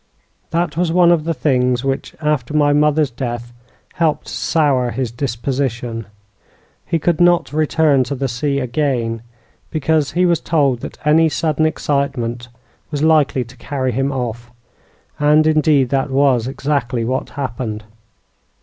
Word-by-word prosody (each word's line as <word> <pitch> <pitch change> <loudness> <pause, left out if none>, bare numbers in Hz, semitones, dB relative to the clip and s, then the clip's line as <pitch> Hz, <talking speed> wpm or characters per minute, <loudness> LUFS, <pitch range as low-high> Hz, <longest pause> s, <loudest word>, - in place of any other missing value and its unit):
"That 170 -2 -1
was 175 -1 +1
one 175 0 +5
of 160 -3 +2
the 165 - 0
things 125 -2 +1
which, 135 0 -3
after 150 -3 -1
my 145 -1 +4
mother's 150 -1 +2
death, 120 -1 -5 0.4
helped 160 -3 0
to - - -8
sour 140 -6 +1
his 125 -1 -3
disposition. 120 -2 -3 0.8
He 165 - +1
could 170 +1 0
not 175 -3 +3
return 155 -3 +2
to 140 +3 -3
the 135 +1 -2
sea 140 +3 -1
again, 125 -4 -1 0.5
because 155 -1 0
he 180 +1 +2
was 170 -3 +2
told 140 -7 +1
that - - -8
any 160 +2 +4
sudden 155 0 +1
excitement 130 -6 -2 0.4
was 145 -1 -2
likely 150 -5 +3
to 120 +2 -16
carry 130 +1 -2
him 135 +4 -1
off; 120 -2 -4 0.7
and, 150 +1 +4
indeed, 155 -4 +3
that 135 +1 0
was 130 -3 +2
exactly 135 -4 -1
what 130 +3 -2
happened." 115 -5 -4
140 Hz, 145 wpm, -18 LUFS, 125-155 Hz, 0.8 s, one